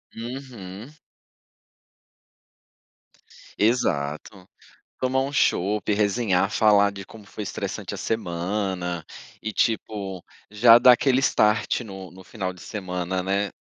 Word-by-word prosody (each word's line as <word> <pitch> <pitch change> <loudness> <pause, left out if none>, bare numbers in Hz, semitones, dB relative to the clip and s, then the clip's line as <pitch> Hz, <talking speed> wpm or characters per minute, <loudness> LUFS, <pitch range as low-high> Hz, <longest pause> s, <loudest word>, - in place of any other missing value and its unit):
Uhum. 120 -3 -8 2.7
Exato. 95 - -1 0.5
Tomar 130 +1 +1
um 135 +1 -2
chopp, 105 -6 +1
resenhar, 100 -2 +1
falar 105 -2 +4
de 100 -1 -8
como 105 +1 -14
foi 105 - -7
estressante 100 - -5
a - - -5
semana, 90 -3 -2 0.4
e 110 - -3
tipo, 100 -4 -2 0.3
já 115 +2 +7
dar 125 +1 +8
aquele 130 +2 +3
start 110 -4 +2
no 95 -5 -9
no 95 +2 -14
final 95 -3 -4
de 90 - -16
semana, 90 -2 -3
né. 100 +2 0
105 Hz, 110 wpm, -24 LUFS, 95-115 Hz, 2.7 s, dar